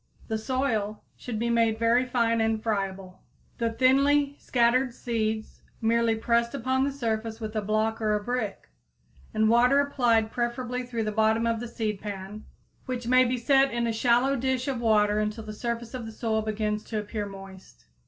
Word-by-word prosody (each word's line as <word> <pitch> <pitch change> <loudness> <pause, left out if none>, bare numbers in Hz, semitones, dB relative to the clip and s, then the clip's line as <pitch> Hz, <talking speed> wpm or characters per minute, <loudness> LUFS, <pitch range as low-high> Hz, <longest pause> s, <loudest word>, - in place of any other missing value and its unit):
The 220 - 0
soil 220 -4 -1
should 240 -3 -6
be 235 +2 0
made 230 -1 +2
very 230 +2 +3
fine 230 -2 +1
and 225 0 +1
friable, 195 -4 -3 0.4
the 230 -1 +1
thinly 275 +4 +3
scattered 245 +1 +2
seeds 220 -2 -3 0.2
merely 230 0 +2
pressed 235 +2 +1
upon 260 0 0
the 280 - 0
surface 225 -4 -3
with 220 -1 -6
a 215 - +1
block 215 +2 0
or 215 -1 +2
a 210 - -2
brick, 240 -3 -3 0.6
and 215 0 +2
water 245 +5 +5
applied 240 -6 +2
preferably 245 +1 -2
through 240 -2 -3
the 215 - -2
bottom 220 +1 +2
of 230 -1 0
the 240 - -5
seedpan, 210 -2 -5 0.4
which 250 -2 -3
may 255 +1 +6
be 250 +1 0
set 270 +3 +3
in 235 0 -1
a 230 - 0
shallow 245 +4 +3
dish 260 0 -1
of 260 -4 -2
water 210 -2 +3
until 215 +1 -2
the 215 0 -7
surface 235 +1 -4
of 245 -3 -5
the - - -7
soil 220 0 -1
begins 215 0 -2
to 220 - -4
appear 210 0 -3
moist. 195 -1 -12
230 Hz, 180 wpm, -27 LUFS, 215-245 Hz, 0.6 s, may